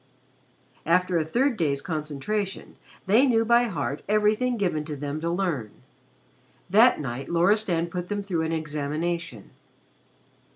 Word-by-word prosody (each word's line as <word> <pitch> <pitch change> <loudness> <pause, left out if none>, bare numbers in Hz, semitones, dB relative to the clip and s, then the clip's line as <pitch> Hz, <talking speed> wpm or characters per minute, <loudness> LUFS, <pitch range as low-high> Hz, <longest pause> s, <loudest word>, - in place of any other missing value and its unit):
After 180 0 +2
a - - +1
third 240 - 0
day's 145 -5 0
concentration 160 +6 -4 0.3
they 225 +8 +4
knew 225 -3 +3
by 235 +1 +4
heart 145 - -3
everything 215 +4 +2
given 175 -7 -1
to 150 -1 -5
them 145 +2 -4
to 170 - -1
learn. 170 - -1 1.0
That 230 +5 +6
night 135 -1 -5
Loristan 175 0 +2
put 180 0 -5
them 205 -1 -2
through 180 -5 -2
an 160 0 -2
examination. 155 - -3
170 Hz, 130 wpm, -25 LUFS, 150-210 Hz, 1.0 s, That